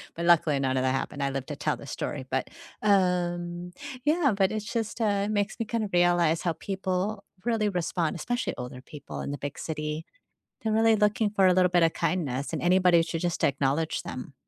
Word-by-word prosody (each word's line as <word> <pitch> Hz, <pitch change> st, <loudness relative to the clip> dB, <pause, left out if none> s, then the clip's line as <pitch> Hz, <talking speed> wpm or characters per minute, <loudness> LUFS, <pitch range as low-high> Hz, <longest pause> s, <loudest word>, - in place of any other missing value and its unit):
But, 170 Hz, 0 st, -3 dB
luckily 155 Hz, -4 st, +4 dB
none 130 Hz, -1 st, 0 dB
of 130 Hz, -, +1 dB
that 130 Hz, -, +2 dB
happened, 140 Hz, +2 st, -2 dB
I 140 Hz, -, +1 dB
lived 135 Hz, -1 st, -4 dB
to 145 Hz, -, -3 dB
tell -, -, -1 dB
the 140 Hz, -, -11 dB
story, 130 Hz, 0 st, -4 dB
but, 135 Hz, 0 st, -1 dB, 0.3 s
um 175 Hz, -3 st, +1 dB, 0.3 s
Yeah, 300 Hz, -6 st, +3 dB
but 195 Hz, -1 st, +2 dB
it's 215 Hz, -1 st, -3 dB
just, 230 Hz, 0 st, -2 dB
uh, 200 Hz, -2 st, +2 dB
it -, -, -2 dB
makes 205 Hz, +2 st, -1 dB
me 230 Hz, -, -1 dB
kind 230 Hz, 0 st, -1 dB
of 205 Hz, -, -3 dB
realize 175 Hz, -2 st, +3 dB
how 170 Hz, -2 st, 0 dB
people 195 Hz, +3 st, -2 dB, 0.2 s
really 220 Hz, -3 st, +1 dB
respond, 175 Hz, -3 st, -1 dB
especially 245 Hz, +9 st, -2 dB
older 125 Hz, +1 st, -7 dB
people 145 Hz, +2 st, -8 dB
in -, -, -4 dB
the 145 Hz, -, -4 dB
big 145 Hz, +1 st, -6 dB
city. 150 Hz, 0 st, -4 dB, 0.6 s
They're 220 Hz, -1 st, 0 dB
really 225 Hz, 0 st, +5 dB
looking 210 Hz, 0 st, +2 dB
for 195 Hz, -2 st, +3 dB
a 180 Hz, -, +5 dB
little 180 Hz, -1 st, +4 dB
bit 175 Hz, -1 st, +4 dB
a 165 Hz, -, +5 dB
kindness, 145 Hz, -7 st, -2 dB
and -, -, -2 dB
anybody 180 Hz, -1 st, +5 dB
should 165 Hz, 0 st, -3 dB
just 175 Hz, 0 st, -1 dB
acknowledge 140 Hz, +3 st, +1 dB
them. 130 Hz, +2 st, -7 dB
175 Hz, 210 wpm, -27 LUFS, 150-205 Hz, 0.6 s, really